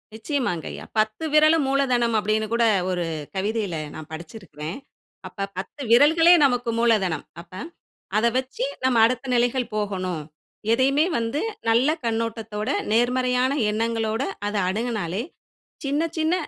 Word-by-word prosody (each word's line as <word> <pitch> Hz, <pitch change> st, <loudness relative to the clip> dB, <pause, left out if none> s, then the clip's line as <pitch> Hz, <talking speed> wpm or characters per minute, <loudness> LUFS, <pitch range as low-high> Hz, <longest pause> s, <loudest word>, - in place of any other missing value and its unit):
நிச்சயமாங்கய்யா. 225 Hz, -, -3 dB
"10 215 Hz, +8 st, 0 dB
விரலும் 310 Hz, 0 st, +5 dB
மூலதனம்" 250 Hz, -4 st, +2 dB
அப்படின்னு 215 Hz, +1 st, 0 dB
கூட 235 Hz, 0 st, +2 dB, 0.3 s
ஒரு 175 Hz, -2 st, -1 dB, 0.3 s
கவிதையில 205 Hz, -1 st, -1 dB, 0.2 s
நான் 155 Hz, -1 st, -9 dB
படிச்சிருக்கிறேன். 160 Hz, -, -8 dB, 0.5 s
அப்ப 195 Hz, -1 st, -5 dB
10 195 Hz, +9 st, -6 dB
விரல்களே 320 Hz, +7 st, +7 dB
நமக்கு 245 Hz, -3 st, +1 dB
மூலதனம். 210 Hz, -8 st, +2 dB, 0.2 s
அப்ப 175 Hz, +2 st, -19 dB, 0.6 s
அத 220 Hz, -, +2 dB
வச்சு 260 Hz, 0 st, -2 dB, 0.2 s
நம்ம 260 Hz, -2 st, +3 dB
அடுத்த 255 Hz, +2 st, -1 dB
நிலைகள் 245 Hz, 0 st, +1 dB
போகணும். 185 Hz, -5 st, -2 dB, 0.5 s
எதையுமே 275 Hz, +5 st, +3 dB
வந்து 230 Hz, +5 st, -1 dB, 0.3 s
நல்ல 240 Hz, +5 st, +4 dB, 0.2 s
கண்ணோட்டத்தோட, 225 Hz, -2 st, -2 dB, 0.2 s
நேர்மறையான 250 Hz, +2 st, +2 dB, 0.2 s
எண்ணங்களோட 225 Hz, +1 st, -1 dB, 0.3 s
அத 205 Hz, -, -3 dB
அணுகுனாலே, 210 Hz, -3 st, -2 dB, 0.6 s
சின்ன 285 Hz, +2 st, 0 dB, 0.2 s
சின்ன 320 Hz, +1 st, +1 dB
230 Hz, 115 wpm, -24 LUFS, 210-255 Hz, 0.6 s, விரல்களே